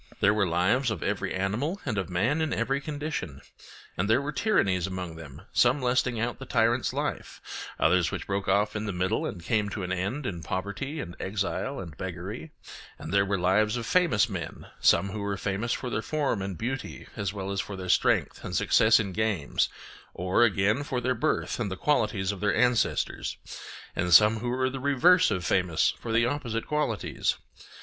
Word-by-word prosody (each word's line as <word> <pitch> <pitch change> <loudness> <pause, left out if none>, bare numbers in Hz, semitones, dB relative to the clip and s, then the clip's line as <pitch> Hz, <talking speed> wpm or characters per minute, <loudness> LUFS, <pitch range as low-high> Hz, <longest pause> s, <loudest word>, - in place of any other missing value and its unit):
There 100 - +4
were 105 -3 +2
lives 95 +10 +2
of 110 -6 -3
every - - -1
animal 110 - -1
and 120 -6 -1
of 95 -2 -3
man 120 - +1
in 155 - 0
every 135 +1 0
condition. 145 - -4 0.6
And 100 +4 -1
there 110 - +5
were 145 +1 -3
tyrannies 140 - +1
among 90 -3 -5
them, 80 0 -11
some 125 +4 +4
lasting 125 -2 +1
out 120 +2 -2
the 135 - -8
tyrant's 115 +2 +2
life, - - -4 0.4
others 90 -2 +3
which - - -5
broke 100 0 -2
off 105 +1 +2
in 105 0 -3
the 100 - -2
middle 90 +1 0
and 85 -4 -7
came 105 +2 +1
to 100 -1 -4
an 90 - -3
end 100 +10 -2
in 85 -6 -4
poverty 100 - -4
and 85 - -6
exile 100 +7 -2
and 85 -5 -8
beggary; 95 - -6 0.5
and 80 - -7
there 100 0 +3
were 100 0 +1
lives 105 +5 +2
of 115 - -4
famous 125 - +3
men, - - -6
some 100 - +4
who 105 - -5
were 100 -1 -2
famous 100 +5 -2
for 125 - -2
their - - -1
form 145 -9 -1
and 95 -2 -4
beauty 130 +3 -4
as 100 -4 -2
well 100 -1 -5
as 100 - 0
for 100 - -7
their 95 -1 -6
strength 90 - +2
and - - -4
success 110 +1 +5
in 100 -3 -2
games, 100 -7 0 0.5
or, 90 +5 +2
again, 105 +3 +2
for 135 -3 -2
their 130 +1 0
birth 125 +2 -1
and 110 -4 -1
the 95 - -5
qualities 105 -9 +1
of 100 - -7
their 105 +1 +1
ancestors; 120 0 +1 0.6
and 90 +1 -1
some 110 +1 +6
who 120 +2 -3
were 130 +1 +1
the 135 +1 -4
reverse 145 +7 +4
of 90 -1 -2
famous 90 -4 +2
for 115 - -5
the 115 +1 +3
opposite 120 -4 -2
qualities. 150 -8 -1
105 Hz, 195 wpm, -27 LUFS, 95-125 Hz, 0.6 s, some